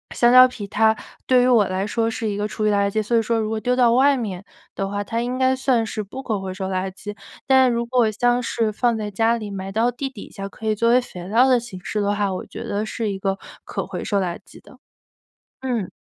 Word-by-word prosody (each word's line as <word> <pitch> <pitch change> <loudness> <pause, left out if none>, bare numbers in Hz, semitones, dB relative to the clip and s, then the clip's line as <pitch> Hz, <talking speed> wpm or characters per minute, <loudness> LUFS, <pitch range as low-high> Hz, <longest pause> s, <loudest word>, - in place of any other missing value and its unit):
香 240 0 +4
蕉 255 0 +9
皮 215 -5 -8
它 220 +2 +3 0.3
对 255 -1 +4
于 250 - +3
我 230 -5 +5
来 190 +2 -2
说 225 +1 0
是 225 -2 -3
一 200 - -3
个 210 - -1
厨 215 +1 -2
余 - - +3
垃 200 0 +2
圾。 215 +2 0
所 230 +2 +1
以 - - +4
说 225 +1 0
如 215 0 -1
果 220 0 -2
丢 250 +2 0
到 240 -2 +4
外 275 +3 +5
面 200 -6 -5 0.3
的 195 - -2
话， 205 +1 -3
它 230 +3 -2
应 250 +2 -3
该 260 0 +3
算 255 -3 +1
是 215 -1 -4
不 260 +7 -8
可 220 -6 -2
回 190 -1 -5
收 190 0 -4
垃 190 0 -2
圾。 205 +2 -9 0.3
但 260 -1 +5
如 235 0 0
果 240 -3 +2
像 245 +3 +1
是 225 -2 0
放 235 +2 +1
在 210 -1 -3
家 225 +3 +2
里 210 -2 -6
埋 195 0 -5
到 225 +4 +2
地 260 +3 -4
底 255 -6 -10
下， 195 0 -6
可 220 +2 -8
以 215 - +2
作 230 +2 +2
为 250 +1 +5
肥 180 -7 -9
料 235 +6 +4
的 255 -2 +4
形 190 -7 -10
式 210 - -3
的 205 0 +1
话， 205 -2 0
我 185 - -4
觉 - - -8
得 205 +2 -2
是 215 -1 -3
一 195 - -4
个 195 0 -2 0.3
可 - - -4
回 - - -5
收 200 - 0
垃 175 -3 -2
圾 - - -15
的。 - - -17 0.8
嗯。 240 -8 -2
220 Hz, 285 characters per minute, -22 LUFS, 200-245 Hz, 0.8 s, 蕉